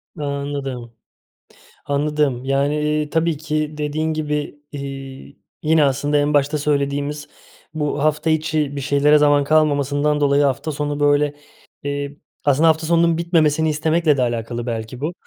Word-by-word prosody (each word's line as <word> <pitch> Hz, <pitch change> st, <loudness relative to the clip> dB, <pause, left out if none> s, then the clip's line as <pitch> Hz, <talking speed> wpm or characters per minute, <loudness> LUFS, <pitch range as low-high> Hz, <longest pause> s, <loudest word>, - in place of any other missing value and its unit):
Anladım, 140 Hz, -4 st, -4 dB, 0.9 s
anladım. 145 Hz, -3 st, 0 dB
Yani, 140 Hz, +2 st, +1 dB
eee, 150 Hz, 0 st, 0 dB
tabii 165 Hz, -1 st, 0 dB
ki 155 Hz, 0 st, -3 dB
dediğin 155 Hz, +2 st, -1 dB
gibi, 150 Hz, -1 st, -3 dB
iii, 135 Hz, -1 st, -8 dB, 0.3 s
yine 155 Hz, 0 st, +4 dB
aslında 145 Hz, +2 st, +1 dB
en 145 Hz, +1 st, +1 dB
başta 145 Hz, +1 st, +2 dB
söylediğimiz 145 Hz, 0 st, -1 dB, 0.5 s
bu 150 Hz, -1 st, -2 dB
hafta 155 Hz, +1 st, +1 dB
içi 155 Hz, -2 st, 0 dB
bir 140 Hz, -, -3 dB
şeylere 145 Hz, +2 st, +4 dB
zaman 145 Hz, -1 st, +4 dB
kalmamasından 150 Hz, -1 st, +2 dB
dolayı 140 Hz, 0 st, +3 dB
hafta 140 Hz, +3 st, 0 dB
sonu 145 Hz, 0 st, -3 dB
böyle, 145 Hz, 0 st, +2 dB, 0.5 s
iii, 145 Hz, 0 st, -4 dB, 0.2 s
aslında 145 Hz, +3 st, +3 dB
hafta 160 Hz, 0 st, +1 dB
sonunun 170 Hz, -1 st, +3 dB
bitmemesini 160 Hz, -2 st, +2 dB
istemekle 155 Hz, 0 st, +1 dB
de -, -, +1 dB
alakalı 120 Hz, 0 st, -2 dB
belki 115 Hz, +2 st, -5 dB
bu, 160 Hz, +4 st, -2 dB
145 Hz, 140 wpm, -20 LUFS, 140-155 Hz, 0.9 s, yine